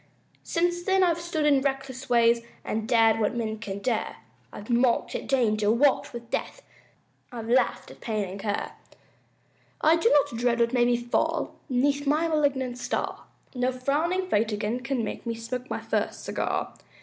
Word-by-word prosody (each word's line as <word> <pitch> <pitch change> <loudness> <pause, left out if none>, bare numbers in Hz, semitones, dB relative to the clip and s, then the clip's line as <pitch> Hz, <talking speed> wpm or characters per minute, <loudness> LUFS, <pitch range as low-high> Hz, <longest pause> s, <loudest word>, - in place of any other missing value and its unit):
Since 350 +1 0
then 380 +1 +2
I've 340 -2 +2
stood 330 -3 -1
in 285 -2 +4
reckless 270 -1 -3
ways, 235 -1 +4 0.2
I've 220 0 -2
dared 225 -2 +4
what 215 +2 0
men 220 -2 -3
can 200 -3 -5
dare, 220 +2 -2 0.4
I've 205 - -9
mocked 240 0 +2
at - - -4
danger, 215 -6 +2
walked 270 +5 +3
with 235 -1 -9
death, - - -3 0.7
I've 230 -2 -6
laughed 250 +3 +1
at - - -15
pain 215 -3 -2
and 190 +2 -7
care. 205 0 -2 1.1
I 320 +2 +5
do 395 +8 +3
not 290 - +2
dread 240 -1 +1
what 235 +1 +2
may 245 -1 +4
befall 240 0 0 0.2
'Neath 280 +3 +1
my 305 +4 +2
malignant 275 -5 0
star, - - -3 0.3
No 250 0 0
frowning 310 +9 0
fate 220 - +1
again 210 +3 -2
can 255 -1 -2
make 215 - -5
Me 230 - -1
smoke 250 +3 -5
my - - -3
first - - -2
cigar. - - -2
245 Hz, 170 wpm, -26 LUFS, 230-285 Hz, 1.1 s, I